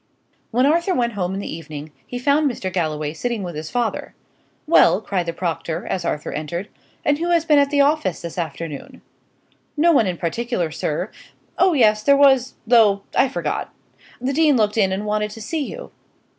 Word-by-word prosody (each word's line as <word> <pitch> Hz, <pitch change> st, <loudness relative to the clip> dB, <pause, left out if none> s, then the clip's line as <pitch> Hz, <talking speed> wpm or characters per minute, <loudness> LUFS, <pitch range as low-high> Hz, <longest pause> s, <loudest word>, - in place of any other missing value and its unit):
When 250 Hz, +3 st, +2 dB
Arthur 340 Hz, +5 st, +2 dB
went 235 Hz, -1 st, 0 dB
home 190 Hz, -2 st, -2 dB
in -, -, -3 dB
the 200 Hz, -, -5 dB
evening, 155 Hz, -2 st, -8 dB, 0.2 s
he 245 Hz, -, -5 dB
found 285 Hz, +4 st, +2 dB
Mr. 190 Hz, -7 st, -5 dB
Galloway 155 Hz, -4 st, -2 dB
sitting 235 Hz, +4 st, -3 dB
with 175 Hz, -1 st, -5 dB
his 155 Hz, +1 st, -6 dB
father. 240 Hz, -2 st, -2 dB, 0.5 s
"Well," 315 Hz, -, +5 dB
cried 185 Hz, -5 st, -2 dB
the -, -, 0 dB
proctor, 165 Hz, -1 st, -3 dB
as 180 Hz, -, -2 dB
Arthur 150 Hz, -3 st, -3 dB
entered, 170 Hz, +6 st, -4 dB, 0.4 s
"and 290 Hz, 0 st, +2 dB
who 340 Hz, +1 st, -1 dB
has 340 Hz, -2 st, +2 dB
been 300 Hz, -3 st, +5 dB
at 280 Hz, 0 st, +3 dB
the 285 Hz, 0 st, +3 dB
office 280 Hz, -, +1 dB
this 170 Hz, +1 st, -5 dB
afternoon?" 155 Hz, -2 st, -6 dB, 0.7 s
"No 335 Hz, +3 st, +5 dB
one 230 Hz, -10 st, +4 dB
in 180 Hz, -2 st, -2 dB
particular, 180 Hz, 0 st, -2 dB
sir. 155 Hz, +5 st, -3 dB, 0.5 s
Oh 370 Hz, -1 st, +4 dB
yes, 215 Hz, -6 st, +4 dB
there 280 Hz, +6 st, +4 dB
was, 265 Hz, -3 st, +4 dB
though 215 Hz, -4 st, +4 dB
I 270 Hz, -, +4 dB
forgot. -, -, -3 dB, 0.5 s
The 255 Hz, +3 st, -2 dB
dean 300 Hz, -2 st, +4 dB
looked 210 Hz, -2 st, +1 dB
in, 195 Hz, -4 st, +2 dB
and 195 Hz, +2 st, -2 dB
wanted 210 Hz, 0 st, -1 dB
to 210 Hz, -, -10 dB
see 295 Hz, +6 st, -3 dB
you." -, -, -9 dB
215 Hz, 190 wpm, -21 LUFS, 175-280 Hz, 0.7 s, Well